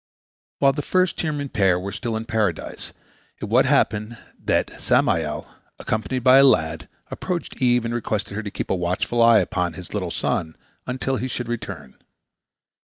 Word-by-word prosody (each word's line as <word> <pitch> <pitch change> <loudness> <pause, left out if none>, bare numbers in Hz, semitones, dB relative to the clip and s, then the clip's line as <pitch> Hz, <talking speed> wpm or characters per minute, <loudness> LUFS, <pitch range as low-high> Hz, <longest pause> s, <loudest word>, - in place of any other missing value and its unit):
While 135 -1 +4
the 145 - -2
first 185 +4 +1
human 145 -3 -2
pair 95 -6 +2
were 100 +2 -5
still 115 +2 -3
in 110 - -5
Paradise, 110 -7 -2 0.5
it - - -4
once - - +3
happened 110 +3 +1 0.3
that - - 0
Samael, 75 -2 +1 0.3
accompanied 120 +3 -2
by 130 +2 +7
a - - +7
lad, 80 -12 +2 0.2
approached 175 -6 -4
Eve 125 -2 +3
and 115 - -2
requested 105 -4 -2
her 110 - -2
to 105 - -5
keep - - -4
a - - +3
watchful 90 +6 0
eye 115 -2 +7
upon 90 -1 -1
his 90 +2 -10
little 95 -4 -2
son 80 -1 -2 0.3
until 130 +1 -1
he 125 +3 -2
should 120 -1 -4
return. 120 - -6
115 Hz, 165 wpm, -23 LUFS, 90-130 Hz, 0.5 s, by